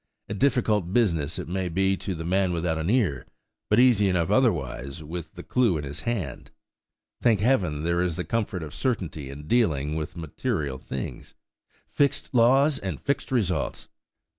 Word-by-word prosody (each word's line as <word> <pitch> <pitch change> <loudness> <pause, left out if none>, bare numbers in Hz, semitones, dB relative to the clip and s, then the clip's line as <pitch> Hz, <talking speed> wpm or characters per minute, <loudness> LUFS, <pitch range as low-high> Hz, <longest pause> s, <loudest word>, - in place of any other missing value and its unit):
"A - - -4
difficult 105 -6 +1
business 85 -11 +1
it - - -5
may 90 +1 -2
be 95 +3 +2
to 95 -1 -4
the 80 0 -5
man 95 +1 +2
without 80 -1 -1
an 80 +3 -1
ear, 100 - +1 0.4
but 105 - +4
easy 115 -6 +5
enough 90 0 +1
otherwise, 70 - 0
with 85 +2 -7
the - - -8
clue 120 -9 +2
in 75 - -4
his 70 +3 -6
hand. 95 - -3 0.7
Thank 115 -5 +4
Heaven, 90 - +1
there 85 +1 +1
is 90 -3 0
the 90 - -2
comfort 105 -6 -2
of 75 - -8
certainty 85 - -2
in 70 +2 -8
dealing 75 - +1
with 80 +2 -4
material 80 - -3
things! 65 - -6 0.5
Fixed 140 -1 0
laws, 135 +5 +4
and 95 -6 -4
fixed 140 0 -2
results! 105 -8 -1
90 Hz, 165 wpm, -26 LUFS, 80-115 Hz, 0.7 s, easy